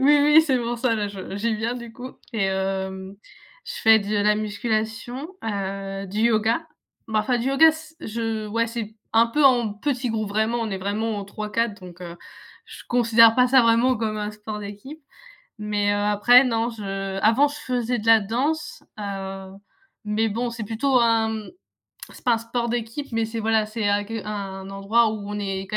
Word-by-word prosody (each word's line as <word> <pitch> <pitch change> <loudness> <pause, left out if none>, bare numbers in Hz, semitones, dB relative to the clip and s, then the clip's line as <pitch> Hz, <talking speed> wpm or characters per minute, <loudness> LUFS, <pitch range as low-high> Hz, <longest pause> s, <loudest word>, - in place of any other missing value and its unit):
oui, 290 +2 +5
oui, 300 +2 +7
c'est 265 -5 +1
pour 240 0 -3
ça 240 -1 +1
là, 210 -2 -2
je 195 -1 -7
j'y 225 +2 0
viens 225 +3 -2
du 235 -2 -8
coup 255 +2 -8 0.2
et 215 -3 0
hem, 190 0 -3 0.5
je 480 - -6
fais 220 0 +7
de 205 +1 -3
la 210 +1 +3
musculation, 220 - -3
heu, 195 -2 -4
du 205 +3 -3
yoga. 230 +6 +2 0.4
Bah, 215 -1 +1
enfin 245 +3 0
du 240 - -1
yoga 315 +4 +6
c 315 0 -11
je, 225 -1 -3
ouais, 230 +2 0
c'est 225 -2 -6 0.2
un 230 +1 +5
peu 295 +6 0
en 240 -5 +4
petit 250 +3 -2
groupe, 215 -2 -2
vraiment, 220 +3 0
on 225 -2 -2
est 195 - -2
vraiment 210 +3 -2
en 200 - -4
3-4 210 +1 -3
donc 180 -1 -12
heu, 170 0 -8 0.5
je - - -11
considère 230 -2 +5
pas 250 0 +4
ça, 260 0 +6
vraiment 235 +2 +3
comme 215 -1 -2
un 210 0 -3
sport 210 0 -7
d'équipe. 205 +10 -9 0.6
Mais, 205 -1 0
heu, - - 0
après 210 +5 +5
non, 230 -2 0
je 195 -3 -4
avant 230 +8 +4
je 290 - -7
faisais 245 -3 -2
de 215 - -7
la 225 0 +7
danse, 260 +10 -2 0.2
heu, 195 -1 -6 0.5
mais 215 +2 +1
bon, 235 +3 -2
c'est 230 -2 -6
plutôt 250 +5 +1
un, 230 -1 +3 0.2
hem, - - -12 0.6
c'est - - -15
pas 245 - +4
un - - -1
sport 235 +1 -3
d'équipe, 240 +3 -4
mais 225 -1 0
c'est 225 0 -5
voilà, 220 -1 +2
c'est 220 +1 -5 0.2
qu 225 0 -4
un 195 -2 -6
endroit 215 +3 +2
où 205 -2 -6
on 210 0 -4
est 195 -1 -3
quand 215 - -2
220 Hz, 200 wpm, -23 LUFS, 205-240 Hz, 0.6 s, oui